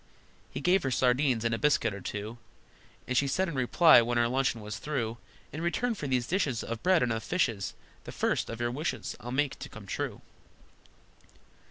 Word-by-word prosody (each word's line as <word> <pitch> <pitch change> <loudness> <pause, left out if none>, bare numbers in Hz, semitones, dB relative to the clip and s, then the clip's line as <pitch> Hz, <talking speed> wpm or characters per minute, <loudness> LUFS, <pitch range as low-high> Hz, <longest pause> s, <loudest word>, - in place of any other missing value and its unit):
He 100 - -6
gave 180 +4 +3
her 135 - -1
sardines, 125 -1 +2
and 115 - +1
a 115 - -1
biscuit 130 -7 +2
or 100 - -7
two, 105 +5 -5 0.7
And 130 - -2
she 140 +3 +3
said 185 +8 +1
in 170 - -4
reply, 135 +3 +6
when 120 +1 -1
her 120 0 +3
luncheon 130 -2 0
was 105 +1 -6
through, 120 -6 -3 0.3
"In 155 - -4
return 230 +8 0
for 150 -9 -5
these 125 -2 +1
dishes 145 - 0
Of 115 0 -5
bread 180 -3 +4
and 120 -2 +1
of 115 - -3
fishes 115 - -1 0.3
The - - -7
first - - 0
of 115 - -6
your 120 0 0
wishes 150 +7 -3
I'll 120 - -7
make 140 +1 0
to - - -7
come - - -11
true!" - - -4
125 Hz, 200 wpm, -29 LUFS, 115-150 Hz, 0.7 s, reply